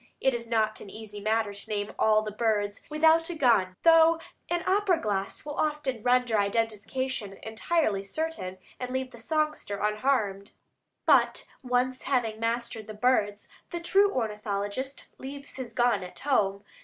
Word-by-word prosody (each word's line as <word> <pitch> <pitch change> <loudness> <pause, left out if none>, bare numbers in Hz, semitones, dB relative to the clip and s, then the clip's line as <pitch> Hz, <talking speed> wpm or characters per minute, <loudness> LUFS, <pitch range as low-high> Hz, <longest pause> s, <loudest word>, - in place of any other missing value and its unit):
It 265 - +2
is 235 -1 -4
not 215 -2 +1
an 200 - -9
easy 210 0 -8
matter 215 0 +1
to 200 +2 -9
"name 205 -1 -2
all 215 0 +4
the 215 - -4
birds 210 -2 0
without 320 +2 +4
a 350 - -4
gun," 230 -10 +3
though 330 0 +6 0.3
an 345 0 0
opera 385 -3 +3
glass 200 -1 -3
will 295 -1 -5
often 300 -6 -1
render 245 -2 +3
identification 220 +1 -1
entirely 220 -1 0
certain, 195 - -4 0.2
and 250 - -4
leave 260 0 -2
the 235 - -12
songster 305 -5 -1
unharmed; 210 -2 0 0.5
but - - +4 0.2
once 255 0 0
having 230 -5 0
mastered 230 -1 -2
the 215 - -7
birds, 210 -3 +1 0.2
the 345 - -4
true 395 +4 +4
ornithologist 210 - -3
leaves 280 +1 -8
his 245 -3 -6
gun 240 -4 +3
at 180 - -10
home. 200 -8 +1
230 Hz, 155 wpm, -28 LUFS, 210-275 Hz, 0.5 s, though